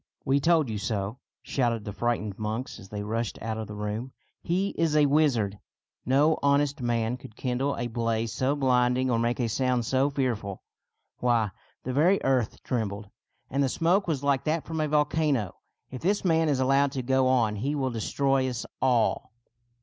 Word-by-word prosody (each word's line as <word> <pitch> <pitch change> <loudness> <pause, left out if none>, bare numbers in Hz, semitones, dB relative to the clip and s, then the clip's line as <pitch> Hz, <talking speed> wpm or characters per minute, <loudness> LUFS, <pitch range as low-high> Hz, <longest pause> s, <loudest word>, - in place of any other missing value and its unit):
" - - -45
We 135 +1 +3
told 160 0 +3
you 110 -2 -3
so! 105 +2 -3
" - - -67
shouted 120 -5 -1
the 105 - -5
frightened 110 -3 -2
monks 110 +4 -4
as 95 -3 -13
they 105 0 -4
rushed 115 +2 -2
out 110 0 -4
of 110 - -5
the 105 - -8
room. 105 +5 -4 0.2
'' - - -49
He 190 +3 +2
is 165 -4 0
a 150 -1 +5
wizard. 130 -9 +2 0.5
No 145 +5 +3
honest 140 0 +2
man 120 0 0
could 110 -3 -13
kindle 130 +3 -1
a 120 - -2
blaze 115 -1 -1
so 130 +5 0
blinding 125 -1 +2
or 115 - +2
make 120 +2 0
a 120 - +1
sound 125 +1 0
so 135 +4 +2
fearful. 120 -8 -2 0.6
Why, 115 -4 +2 0.3
the 130 - -3
very 175 +8 +4
earth 130 -4 0
trembled, 105 -4 -3 0.4
and 140 - +1
the 135 - +2
smoke 175 +8 +2
was 145 -5 -1
like 140 -1 +2
that 155 +1 0
from 160 -1 -3
a 155 - +1
vol 150 0 +3
cano. 145 - -1 0.3
If 130 - -7
this 200 +3 0
man 165 -2 +3
is 140 -3 +1
allowed 135 +1 +3
to 130 -3 -3
go 130 +1 +2
on 115 -5 +2
he 140 +8 -1
will 135 -3 -1
destroy 130 +3 0
us 125 -2 -4 0.2
all." 125 -4 +1
130 Hz, 195 wpm, -27 LUFS, 115-140 Hz, 0.6 s, a